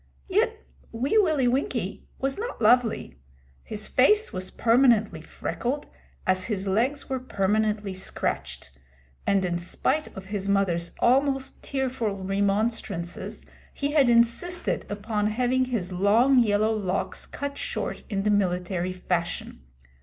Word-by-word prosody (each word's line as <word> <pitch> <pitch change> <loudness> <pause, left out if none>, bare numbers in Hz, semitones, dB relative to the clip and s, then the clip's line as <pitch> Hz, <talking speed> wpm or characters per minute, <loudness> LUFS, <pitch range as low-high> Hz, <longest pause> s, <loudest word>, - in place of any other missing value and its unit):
Yet 440 +3 0 0.3
Wee 265 - +2
Willie 310 -10 +3
Winkie 245 -5 -1
was 270 0 -1
not 475 +3 -4
lovely. 225 - +2 0.4
His 215 -1 -5
face 420 +12 +3
was 185 0 -4
permanently 230 -7 +3
freckled, 250 - -3 0.4
as 185 0 +1
his 200 -3 -2
legs 245 +9 0
were 265 -1 -2
permanently 210 -3 0
scratched, 185 - -3 0.6
and 195 -2 +3
in 175 -1 -1
spite 295 - 0
of 190 - -7
his 200 0 -3
mother's 180 -4 +1
almost 270 +1 +2
tearful 260 -6 -2
remonstrances 200 -2 -1 0.3
he 285 0 -1
had 285 -5 +4
insisted 235 +10 +2
upon 210 +1 -1
having 250 +4 +1
his 230 -8 -3
long 220 +8 +4
yellow 215 -1 +3
locks 195 -3 -2
cut 285 0 -5
short - - -3
in 195 -3 -1
the 210 - +2
military 180 -2 0
fashion. 180 - -3
220 Hz, 125 wpm, -26 LUFS, 195-260 Hz, 0.6 s, had